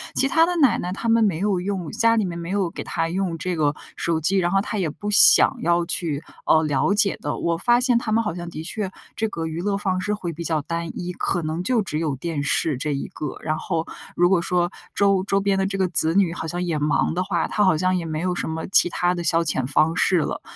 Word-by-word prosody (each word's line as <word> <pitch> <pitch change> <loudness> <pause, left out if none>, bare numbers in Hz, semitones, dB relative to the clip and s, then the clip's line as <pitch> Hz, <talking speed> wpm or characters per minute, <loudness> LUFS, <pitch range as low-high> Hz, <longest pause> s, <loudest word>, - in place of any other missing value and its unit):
其 270 - +3
她 325 +3 +3
的 355 - -1
奶 275 -7 +3
奶 180 - -4
她 200 +5 -4
们 225 0 +4
没 190 -7 +1
有 195 0 0
用 185 -4 -4
家 230 0 +2
里 220 -3 +1
面 170 -2 -5
没 170 +1 -6
有 190 -3 -1
给 - - -7
她 165 - -2
用 175 -1 -2
这 180 +2 -3
个 150 -2 +1 0.2
手 165 -1 -1
机， 185 +5 +1
然 175 -1 +1
后 195 - +3
她 210 - -4
也 170 - 0
不 205 +7 -6
想 205 - +7
要 170 +1 +1
去， 165 -3 -2 0.2
呃， 160 0 +4
了 150 +6 +1
解 205 -1 +3
的。 - - -3
我 170 -1 -1
发 240 +6 +3
现 245 -1 +2
她 230 -2 -3
们 230 +1 +2
好 210 - -3
像 175 0 -7
的 155 - -7
确 195 +2 -4 0.2
这 220 - -1
个 165 -4 -5
娱 160 +2 -5
乐 200 +1 -1
方 185 -2 -1
式 210 +3 -1
会 180 -5 -4
比 170 +2 -7
较 160 -3 -1
单 170 +2 -4
一， 180 0 -4
可 175 0 -1
能 160 +3 -3
就 230 +3 +1
只 155 -5 -3
有 155 -4 -1
电 155 +2 -4
视 145 0 +1
这 145 +2 -2
一 140 - -4
个， 150 - -6
然 155 0 -2
后 165 -1 -3 0.3
如 175 +1 +3
果 190 -3 +3
说 175 0 0 0.2
周 195 -2 +2
周 195 0 +1
边 195 0 0
的 195 - +1
这 195 0 -3
个 190 -1 +1
子 160 -1 +4
女 190 -4 +3
好 165 - -5
像 175 +2 -3
也 170 -3 -1
忙 150 +2 +1
的 180 +2 -1
话， 175 -4 -1
她 210 - 0
好 185 -5 +3
像 185 +3 +1
也 175 -2 -2
没 155 -1 -3
有 180 0 -1
什 175 - -3
么 160 0 -4
其 185 - +5
他 175 +1 0
的 175 -1 -4
消 165 0 +3
遣 130 -5 -1
方 155 +4 +2
式 185 - +3
了。 - - -3
175 Hz, 290 characters per minute, -22 LUFS, 165-195 Hz, 0.3 s, 想